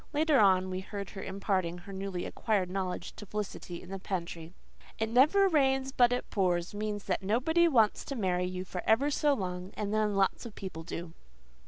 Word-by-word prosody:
Later 300 -1 +3
on 185 -2 +4
we 185 - -2
heard 200 +1 -6
her 195 - -7
imparting 190 -3 -1
her 195 +3 -10
newly 190 -2 -4
acquired 195 -5 -1
knowledge 185 -1 -3
to 210 - -8
Felicity 195 -4 -5
in 180 - -12
the 195 - -4
pantry. 170 -3 -4 0.5
"'It 220 - 0
never 300 - +5
rains 270 -5 +2
but 245 -2 +4
it 245 - -1
pours' 180 -3 +1
means 205 0 -3
that 185 - -1
nobody 260 - +3
wants 225 -9 +3
to 275 - -4
marry 180 -5 0
you 185 0 -4
for 180 -1 -5
ever 275 +7 +4
so 290 0 +2
long, 180 -4 -4
and 210 0 -3
then 215 -1 +1
lots 195 -1 +1
of 230 -3 -9
people 185 -4 -6
do." 170 0 -6
200 Hz, 195 wpm, -30 LUFS, 185-240 Hz, 0.5 s, never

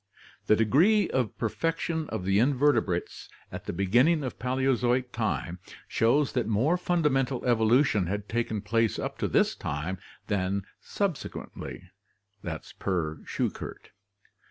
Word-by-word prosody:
The 110 - +6
degree 170 - +4
of 125 -4 -1
perfection 165 +5 -1
of 90 - -4
the 95 +1 +3
invertebrates 130 -8 +1 0.2
at - - -7
the - - -3
beginning 120 - +3
of 130 - -5
Paleozoic 125 -1 +1
time 100 -6 -2 0.3
shows 135 +5 +2
that 125 -4 -1
more 115 +10 +2
fundamental 150 -8 0
evolution 115 -3 +3
had 100 +2 -3
taken 115 -2 -1
place 115 +2 +1
up - - -4
to - - 0
this - - +3
time 75 +6 -4 0.3
than 100 -1 -1
subsequently 195 -7 -5 0.5
(Schuchert) 80 -1 -4
120 Hz, 115 wpm, -28 LUFS, 100-140 Hz, 0.5 s, The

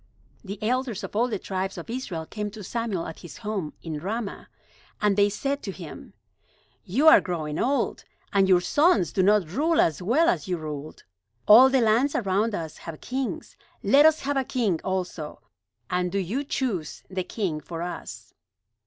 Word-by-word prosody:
The 200 0 -6
elders 245 -2 -1
of - - -7
all 235 +3 +3
the 220 -4 -2
tribes 190 0 -4
of 170 - -7
Israel 215 -10 -4
came 210 +4 -4
to 210 0 -10
Samuel 215 -4 -2
at 160 - -8
his 175 - -11
home 205 -8 -4
in 155 -3 -4
Ramah; 205 +5 -4 0.5
and 210 -1 +2
they 205 0 +4
said 275 +7 -2
to 195 - -5
him: 175 -5 -10 0.7
"You 265 - +1
are 325 +1 +9
growing 155 -4 -3
old, 275 +3 0 0.3
and 195 -1 +4
your 180 -2 +5
sons 290 - +3
do 190 - +2
not 200 -2 +4
rule 320 - +1
as 160 +1 +2
well 260 - +3
as 345 - +1
you 180 -1 -1
ruled. 155 -1 -7 0.4
All 245 +5 +9
the 265 -1 +3
lands 235 +6 +3
around 205 0 +1
us 160 -4 -5
have 165 -2 -8
kings. 260 0 -4 0.3
Let 290 +3 +7
us 315 0 +2
have 280 0 -1
a 270 - +2
king 225 -10 0
also; 180 -5 -3 0.5
and 180 0 -1
do 200 - -1
you 200 +9 -1
choose 225 - -3
the 185 -1 -3
king 180 -6 -3
for 165 +2 -6
us." 175 - -7
205 Hz, 180 wpm, -26 LUFS, 180-250 Hz, 0.7 s, are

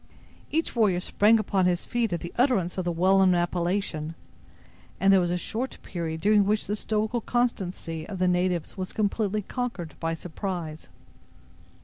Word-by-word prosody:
Each 325 -3 -1
warrior 205 -6 +3
sprang 210 +4 +4
upon 195 -3 +1
his 175 -1 0
feet 235 -4 0
at 170 - -2
the 170 - -7
utterance 240 -9 +2
of 185 - -2
the 175 - +1
well 185 +3 +3
known 185 -2 +5
appellation, 175 -2 -1 0.8
and 195 0 +5
there 190 - +6
was 175 -1 +1
a 175 - 0
short 230 +8 -3
period 160 -3 -4
during 210 +2 +5
which 210 +2 +1
the 210 - -1
stoical 220 +2 -1
constancy 185 -10 -2
of 195 - -5
the 185 0 +2
natives 180 -2 0
was 185 -2 -5
completely 210 -1 0
conquered 195 -9 -4
by 165 0 -1
surprise. 170 -2 -5
190 Hz, 165 wpm, -26 LUFS, 175-215 Hz, 0.8 s, there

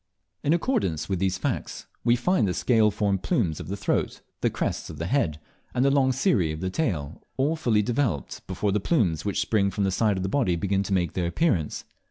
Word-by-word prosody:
In 145 - +1
accordance 170 - 0
with 95 -3 -1
these 95 0 0
facts, - - -3 0.2
we 120 0 +4
find 125 - +2
the 90 - -1
scale 110 -4 +3
formed 100 -2 0
plumes 95 - 0
of - - -7
the 100 +2 -4
throat, - - -1 0.2
the - - +3
crests - - -3
of - - -8
the 80 - -3
head, 85 - 0 0.4
and 125 +2 +3
the 140 - +4
long 135 -2 +3
cirrhi 125 - +2
of 80 - -5
the 95 +1 -2
tail, 85 - -2 0.2
all 145 +5 +2
fully 115 -9 +2
developed 115 - -2
before 105 - -1
the 105 - +1
plumes 95 - +1
which 100 - -1
spring 100 -3 +2
from 100 +1 -2
the 95 - +1
side 105 +1 +1
of 95 - -2
the - - -1
body 95 -5 +1
begin 95 +3 0
to 100 0 -2
mane 90 -4 +1
their 90 -2 -1
appearance. 85 - 0
100 Hz, 225 wpm, -26 LUFS, 90-130 Hz, 0.4 s, we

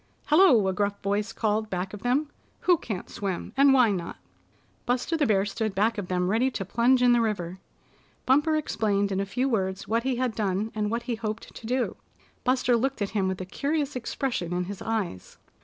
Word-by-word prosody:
"Hello!" 295 - +5
a 190 - +1
gruff 200 +1 -1
voice 200 +1 0
called 215 0 -1
back 185 +1 -3
of 210 - -8
them. 280 +5 0 0.3
"Who 360 - +5
can't 215 - -5
swim, 195 -3 -4
and 275 +1 +6
why 250 -5 +5
not?" 175 -4 -4 0.7
Buster 250 +7 0
the 300 -4 +2
Bear 200 -2 +3
stood 215 0 -3
back 215 +3 +1
of 190 - -5
them 180 0 0
ready 240 +5 +2
to 210 -6 -4
plunge 245 +5 +3
in 245 - +6
the 240 -1 +4
river. 190 -5 -2 0.7
Bumper 295 +4 +3
explained 205 -9 0
in 190 - 0
a 195 - -1
few 255 +7 0
words 190 -6 -1
what 230 +2 +1
he 260 +1 -1
had 250 -1 -1
done, 210 +1 -1
and 210 -1 -1
what 235 +2 -2
he 245 - -2
hoped 220 0 -5
to 225 - -9
do. 250 +1 -1 0.5
Buster 255 -1 +2
looked 255 -1 0
at 200 - -4
him 195 -3 0
with 190 0 -3
a - - -4
curious 285 - -2
expression 235 -7 -2
in 180 0 0
his 195 +2 -7
eyes. 210 - -3
220 Hz, 205 wpm, -26 LUFS, 195-255 Hz, 0.7 s, and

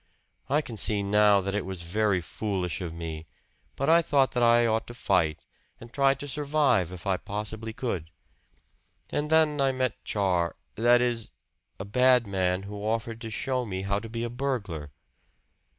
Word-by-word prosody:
I 145 +3 +3
can 115 -5 -8
see 100 0 +1
now 105 0 +4
that 100 +1 -3
it 105 - -1
was 95 -2 -6
very 100 +1 +1
foolish 90 -3 -3
of 85 -3 -4
me; 80 -1 -6 0.5
but 140 - -2
I 165 +1 +6
thought 140 -4 +2
that 125 - -1
I 120 0 +5
ought 110 -1 0
to 120 - -9
fight, 85 -9 0 0.3
and 115 +1 -13
try 135 -1 +3
to 145 +1 -7
survive 140 - +1
if 90 -2 -9
I 95 -1 +1
possibly 105 +2 -5
could. 95 -9 -4 1.0
And 150 +1 -1
then 155 -2 +3
I 135 -1 +3
met 130 -3 -2
Char 90 -5 0 0.2
that 120 +2 +4
is, 120 -2 -1 0.5
a 95 - -5
bad 125 +3 +4
man 95 -2 0
who 105 +1 -7
offered 115 +1 -2
to 115 - -5
show 130 +3 -1
me 95 -4 -4
how 100 +1 0
to 115 +1 -9
be 115 +1 -4
a 120 - -2
burglar." 105 - -3
110 Hz, 180 wpm, -27 LUFS, 95-125 Hz, 1.0 s, I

